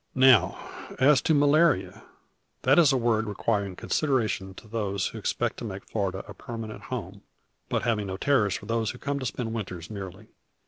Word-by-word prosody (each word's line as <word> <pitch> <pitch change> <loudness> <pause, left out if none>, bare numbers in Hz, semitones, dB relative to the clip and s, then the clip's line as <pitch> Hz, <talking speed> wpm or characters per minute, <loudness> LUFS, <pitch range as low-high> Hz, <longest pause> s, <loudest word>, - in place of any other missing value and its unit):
Now 130 -3 +5 0.3
as 135 -2 +5
to 160 - +2
malaria. 145 +1 +3 0.6
That 135 +6 +5
is 155 -4 +6
a 135 - +2
word 115 -2 +1
requiring 100 -2 -1
consideration 110 - -1
to 110 - -13
those 100 -3 -2
who - - -8
expect - - -1
to - - -7
make 100 -3 -6
Florida 95 -3 -3
a 105 - -8
permanent 115 -1 -7
home, - - -6 0.5
but - - 0
having 110 -4 0
no 95 0 -4
terrors 105 -6 +2
for - - -7
those 115 -1 0
who - - -5
come 140 +2 -2
to 130 - -2
spend 115 -2 -4
winters 95 -5 -5
merely. 100 0 -8
115 Hz, 180 wpm, -27 LUFS, 100-130 Hz, 0.6 s, is